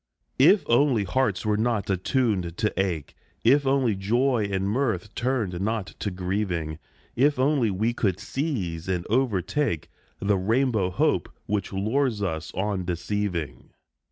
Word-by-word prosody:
If 200 -1 +6
only 120 -2 +3
hearts 105 0 0
were 105 -1 +2
not 115 -2 0
attuned 95 - 0
to 110 -1 0
ache, 90 -6 -1 0.3
If 140 +4 +4
only 135 -4 +3
joy 110 +3 +1
and 95 0 0
mirth 110 -4 -1
turned 115 -8 -1
not 110 -1 -2
to 105 - -1
grieving, 90 -4 -2 0.4
If 140 +3 +3
only 130 -3 +2
we 110 +5 0
could 100 -6 0
seize 105 - -3
and 90 -2 -1
overtake 110 - 0 0.3
The 100 -1 +1
rainbow 110 -1 +1
Hope 90 - +1 0.2
which 105 -1 -2
lures 110 +3 0
us 80 -3 -3
on 95 0 -1
deceiving 90 -2 -3
105 Hz, 135 wpm, -25 LUFS, 95-125 Hz, 0.4 s, If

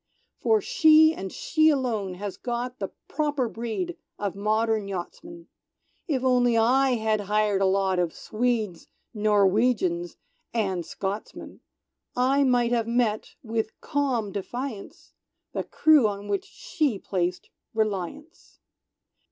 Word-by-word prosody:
"For 440 -1 +3
She, 315 -8 +6
and 190 - -6
she 315 -1 +2
alone, 230 -10 -1
has 200 +1 -5
got 245 +1 -4
The 195 - -2 0.2
proper 290 -4 -1
breed 235 +11 -4 0.2
of 200 -2 -3
modern 215 +1 0
Yachtsmen! 330 - -7 0.6
If 270 -6 -1
only 245 -2 +3
I 255 +3 +3
had 220 -2 0
hired 210 -2 +2
a 195 - +4
lot 190 -1 +1
Of 175 -2 +1
Swedes, 220 -5 -2 0.3
Norwegians 205 -4 +2 0.4
and 190 -6 0
Scotsmen, 195 +5 -6 0.6
I 265 +3 +3
might 245 -2 +2
have 230 -2 +1
met, 230 -3 0
with 225 -1 -3
calm 255 -8 -1
defiance, 225 +3 -6 0.4
The - - -2
crew 305 -7 +4
on 200 0 -5
which 200 -1 -1
She 305 - -2
placed 180 -2 -3 0.2
Reliance. 220 - -3
225 Hz, 120 wpm, -26 LUFS, 200-265 Hz, 0.6 s, She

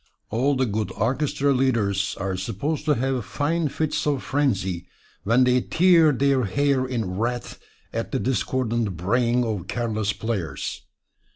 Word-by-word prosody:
All 130 +6 +2
the 130 0 +2
good 110 -1 -2
orchestra 140 +4 +1
leaders 105 -7 +1
are 95 -1 -2
supposed 115 +12 -3
to 150 -2 +3
have 130 0 -1
fine 150 - -1
fits 150 +1 -1
of 140 -3 0
frenzy 95 -11 -1 0.4
when 115 +5 +4
they 125 0 +3
tear 170 -1 +5
their 135 -2 +2
hair 135 +4 +1
in 110 -7 -3
wrath 120 +2 -3 0.3
at - - -3
the - - 0
discordant 120 -6 -1
braying 120 +7 +1
of 105 -6 -3
careless 110 -2 -1
players. 100 -11 -4
125 Hz, 145 wpm, -24 LUFS, 105-140 Hz, 0.4 s, tear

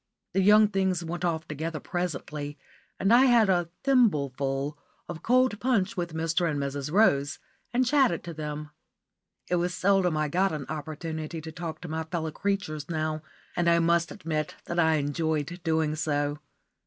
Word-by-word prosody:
The 195 - +3
young 210 +2 +7
things 190 -3 0
went 175 +1 -4
off 165 -2 -1
together 155 +1 -4
presently, 150 -5 -4 0.4
and 195 +4 +3
I 250 +3 +7
had 235 -6 +5
a 175 -2 +1
thimbleful 145 - +1 0.3
of 160 - -7
cold 255 -3 +3
punch 230 -4 +1
with 175 -3 -3
Mr. 165 +1 +1
and 145 -2 -1
Mrs. 140 +1 -3
Rose, 150 -7 +3 0.3
and 255 +1 +2
chatted 260 - +3
to 170 - -6
them. 150 -1 -5 0.8
It 180 - +1
was 175 +1 -1
seldom 185 -3 +2
I 155 0 +1
got 185 +4 +1
an 150 -3 -4
opportunity 155 +1 -5
to 160 +1 -7
talk 160 0 -6
to 180 - -7
my 160 0 -2
fellow 160 -1 -3
creatures 185 -6 -2
now, 155 -1 -1 0.3
and 175 -1 +2
I 170 - +5
must 170 0 +2
admit 155 -1 -3
that 170 - -2
I 160 -1 +4
enjoyed 155 +3 -1
doing 160 -2 +1
so. 145 -1 -1
165 Hz, 165 wpm, -27 LUFS, 155-185 Hz, 0.8 s, young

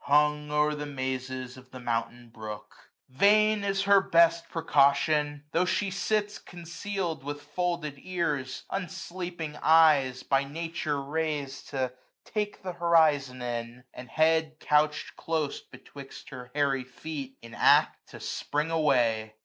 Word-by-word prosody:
Hung 150 +1 +3
o*er 150 0 +2
the 150 0 -5
mazes 130 -1 -4
of 130 0 -15
the 130 - -10
mountain 120 0 -3
brook. 110 -2 -9 0.4
AUTUMN. 130 - -21
137 215 +1 +5
Vain 200 - -1
is 195 0 0
her 200 0 +6
best 170 -2 +3
precaution; 145 -1 +2
tho' 170 - +2
she 195 +1 0
sits 210 +2 -1
410 175 -1 -12
Conceal'd, 170 -2 -4
with 145 +1 -6
folded 155 -1 -3
ears; 150 -7 -2
unsleeping 180 -4 -5
eyes. 150 -5 +5
By 135 0 +2
Nature 155 0 -3
rais'd 145 -1 -3
to 130 -3 -2 0.3
take 210 -2 -3
th' 180 -2 -5
horizon 150 -7 +3
in; 120 0 -5
And 125 0 -10
head 160 -1 +2
couch 150 0 +2
M - - -17
close 160 -3 -2
betwixt 140 -1 -12
her 125 -2 -9
hairy 140 -3 +1
feet. 135 +1 -7
In 115 -1 -11
act - - +3
to - - -11
spring 150 +3 -2
away. 120 -9 +1
150 Hz, 145 wpm, -28 LUFS, 130-170 Hz, 0.4 s, her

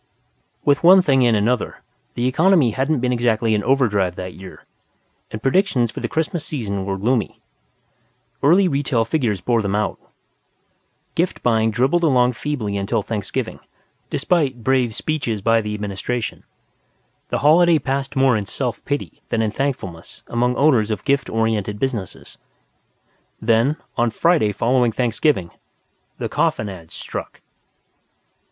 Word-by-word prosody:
With 145 +1 +2
one 185 +2 +7
thing 135 -5 +3
and 115 - +3
another, 115 +3 -1 0.3
the 120 - -1
economy 155 0 +3
hadn't 135 +3 0
been 125 0 +1
exactly 115 -2 +1
in 105 -1 0
overdrive 105 -9 +1
that 90 0 -6
year, 95 0 -12 0.6
and 110 +1 -7
predictions 135 - +2
for - - -7
the - - -2
Christmas 160 0 -2
season 100 -9 -4
were 95 0 -2
gloomy. 115 +3 -1 1.0
Early 180 +7 +5
retail 135 -6 0
figures 115 - -1
bore 115 +4 +1
them 100 -1 -1
out. 105 0 -1 1.1
Gift 175 +2 -1
buying 110 -2 +2
dribbled 130 +10 +1
along 125 -5 +3
feebly 115 -7 -3
until 100 +2 -1
Thanksgiving, 105 -2 -4 0.5
despite 135 -6 0
brave 125 -3 +1
speeches 140 -9 -2
by 115 +2 +2
the 105 0 -4
Administration. 105 +3 -4 0.8
The - - 0
holiday 170 +2 +6
passed 135 -1 -3
more 135 -2 +4
in 105 -2 -2
self 125 +3 -3
pity 145 0 -4
than 115 - 0
in 110 - -1
thankfulness 110 -10 -4
among 125 +1 0
owners 125 -7 +3
of 110 - -3
gift 140 -1 +1
oriented 110 -2 -1
businesses. 115 -6 -5 1.0
Then, 115 +6 +2 0.2
on 120 -1 +2
Friday 155 -3 +2
following 120 +3 +2
Thanksgiving, 115 - 0 0.7
the - - -3
coffin 105 - 0
ads 85 -4 -11
struck. - - -7
120 Hz, 140 wpm, -20 LUFS, 105-140 Hz, 1.1 s, one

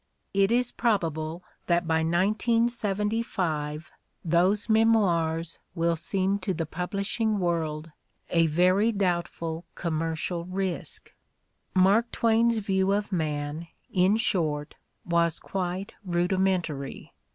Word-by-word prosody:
It 195 +1 +3
is 245 0 +2
probable 165 -7 -1 0.2
that 175 0 +2
by 160 0 +2
1975 195 -4 0 0.3
those 185 +6 +2
memoirs 175 -8 +2 0.2
will 170 0 +1
seem 195 +4 0
to 190 -1 -2
the 165 0 -2
publishing 200 +6 -1
world 165 -3 -2 0.4
a 165 -1 +4
very 185 +7 +3
doubt 180 -5 0
ful 165 0 -5
commercial 165 +1 -2
risk. 185 -1 -4 0.6
Mark 200 +6 +4
Twain's 230 0 +3
view 195 -2 +1
of 205 +1 -1
man, 155 -1 -2 0.3
in 185 +3 +4
short, 155 -9 0 0.3
was 170 -1 +1
quite 185 0 -4
rudi 175 0 0
mentary. 170 -8 -1
180 Hz, 105 wpm, -27 LUFS, 165-205 Hz, 0.6 s, a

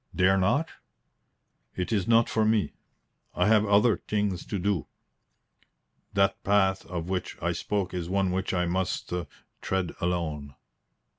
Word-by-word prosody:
"Dare 95 +1 +4
not?" 140 - +2 1.1
"It 90 +3 -3
is 100 -4 0
not 115 0 +5
for 110 - +1
me. 110 -1 +1 0.6
I 90 - +2
have 110 -1 +4
other 105 +2 +4
things 105 -4 -2
to 100 - -2
do. 95 -4 -1 1.3
That 100 -1 +1
path 95 -1 +2
of 85 -2 -4
which 95 -1 -3
I - - 0
spoke 100 -3 -2
is 90 -2 -4
one 95 -1 +1
which 95 +1 -1
I 90 -1 +1
must 90 0 -2 0.5
tread 95 -2 -1
alone." 80 -6 -2
95 Hz, 140 wpm, -27 LUFS, 90-105 Hz, 1.3 s, not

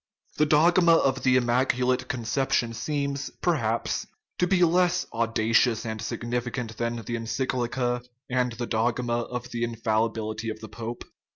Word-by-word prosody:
The 150 - +3
dogma 170 +3 +5
of 135 -4 +2
the 130 -1 +3
immaculate 125 +1 +2
conception 120 0 0
seems, 140 +3 -2
perhaps, - - 0 0.3
to 180 - +3
be 180 -1 +3
less 180 +1 +3
audacious 115 0 +2
and 110 -1 -4
significant 120 0 -3
than 115 0 -1
the 120 0 -6
encyclica 120 +1 -1 0.2
and 125 -1 +1
the 120 +1 -4
dogma 120 +1 0
of 125 +1 -5
the 120 0 -2
infallibility 110 -1 -1
of 110 - -5
the 110 - -9
pope. 115 +2 -6
120 Hz, 135 wpm, -26 LUFS, 115-130 Hz, 0.3 s, dogma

